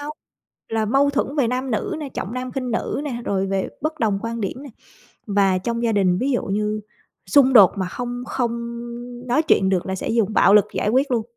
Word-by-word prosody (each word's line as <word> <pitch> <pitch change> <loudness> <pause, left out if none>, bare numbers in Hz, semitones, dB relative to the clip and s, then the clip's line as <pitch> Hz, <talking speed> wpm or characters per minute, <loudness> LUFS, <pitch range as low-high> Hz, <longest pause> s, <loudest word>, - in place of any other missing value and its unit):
nhau, 295 +1 -5 0.6
là 225 -1 0
mâu 275 +5 +3
thuẫn 285 +1 -2
về 250 -5 +2
nam 255 +1 -2
nữ 335 - -2
nè, 295 - -5
trọng 220 -5 -5
nam 255 0 -4
khinh 255 -2 -3
nữ 230 - -2
nè, 240 -4 -4
rồi 195 -1 0
về 195 -1 -1
bất 310 +2 -3
đồng 210 -4 +1
quan 230 0 -4
điểm 225 +7 -4
nè. 285 - -9 0.6
Và 195 -3 +2
trong 235 +5 -3
gia 230 -1 +1
đình 185 -3 +2
ví 275 +2 0
dụ 245 - 0
như 210 +2 -1 0.5
xung 270 -2 +5
đột 205 -7 +8
mà 185 - -1
không 245 +4 -5
không 235 -1 -3 0.5
nói 250 +6 +2
chuyện 195 -11 +3
được 185 -2 0
là 190 - -2
sẽ 190 - -4
dùng 225 -2 +1
bạo 205 - +5
lực 210 - +7
giải - - 0
quyết 260 +5 +2
luôn. 235 -3 +1
235 Hz, 225 wpm, -22 LUFS, 205-260 Hz, 0.6 s, đột